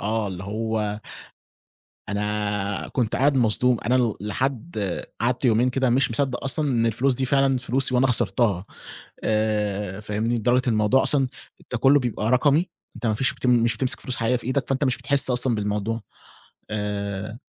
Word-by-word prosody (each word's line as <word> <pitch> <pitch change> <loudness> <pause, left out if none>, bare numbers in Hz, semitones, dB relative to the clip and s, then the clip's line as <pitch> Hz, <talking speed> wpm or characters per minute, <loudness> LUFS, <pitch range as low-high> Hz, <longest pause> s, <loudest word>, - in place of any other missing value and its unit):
آه، 110 +1 -1
اللي 95 0 -6
هو 105 0 -2 1.1
أنا 105 -1 -2
كنت 120 -4 -1
قاعد 140 0 +2
مصدوم 120 +1 +3
أنا 120 -1 +2
لحد 125 +7 -3 0.5
قعدت 125 +3 0
يومين 120 +1 +3
كده 130 0 +1
مش 125 +1 +2
مصدق 125 +2 -1
أصلًا 145 +2 +1
إن 115 -3 +1
الفلوس 125 +4 +1
دي 130 +1 -1
فعلًا 135 0 +2
فلوسي 130 +1 0
وأنا 130 +2 +4
خسرتها. 115 -6 +2 0.6
آآ، 105 -2 -1
فاهمني؟ 105 +3 -1
لدرجة 120 +3 +2
إن - - +3
الموضوع 110 +5 +3
أصلًا 135 -3 +2 0.4
ده 125 - -1
كله 135 +4 +5
بيبقى 120 -2 -2
رقمي 145 +7 +3 0.3
أنت 115 -1 -6
ما 110 - +2
فيش 130 +5 0
مش 120 -2 +3
بتمسِك 130 0 +1
فلوس 130 - -3
حقيقية 115 +2 +1
في 120 - -2
إيدك 130 +1 -1
فأنت 135 +1 0
مش 130 -3 +1
بتحس 140 +1 +2
أصلًا 125 -1 +1
بالموضوع. 105 +2 -2 0.7
آآ 105 +1 -4
120 Hz, 160 wpm, -24 LUFS, 105-130 Hz, 1.1 s, كله